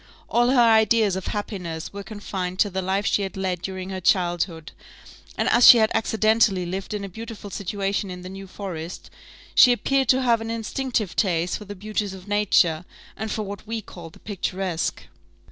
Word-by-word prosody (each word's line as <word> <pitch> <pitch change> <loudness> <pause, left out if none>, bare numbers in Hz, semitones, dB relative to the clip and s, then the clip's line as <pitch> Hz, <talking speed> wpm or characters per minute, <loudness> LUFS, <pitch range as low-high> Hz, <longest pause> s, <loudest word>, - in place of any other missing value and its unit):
All 240 +1 +3
her 260 -1 +4
ideas 220 -3 +4
of 190 - -5
happiness 180 -6 -5
were 200 - -6
confined 195 -3 -5
to 205 - +2
the 190 +1 -2
life 190 +2 -1
she 205 - +2
had 195 -1 -4
led 185 -2 -2
during 190 +1 -5
her 190 -1 -5
childhood; 175 -3 0 0.7
and - - 0
as 240 +1 +6
she 240 - +11
had 220 -1 +3
accidentally 220 -4 +2
lived 190 +4 -4
in 205 - -4
a - - -4
beautiful 220 +1 -9
situation 200 +1 -2
in 180 0 -8
the - - -7
New 195 0 -9
Forest, 180 -3 -7 0.4
she 250 - +7
appeared 270 +2 +1
to 260 0 +4
have 235 -2 +3
an 225 - -5
instinctive 230 -2 -2
taste 175 -4 +1
for 210 - -10
the 205 +1 -8
beauties 205 0 -3
of 185 +1 -13
nature, 190 -5 +2 0.3
and 220 0 -4
for 215 - -2
what 200 +1 -8
we 225 0 -2
call 175 -5 -11
the - - -18
picturesque. 190 -4 -3
200 Hz, 190 wpm, -24 LUFS, 185-220 Hz, 0.7 s, she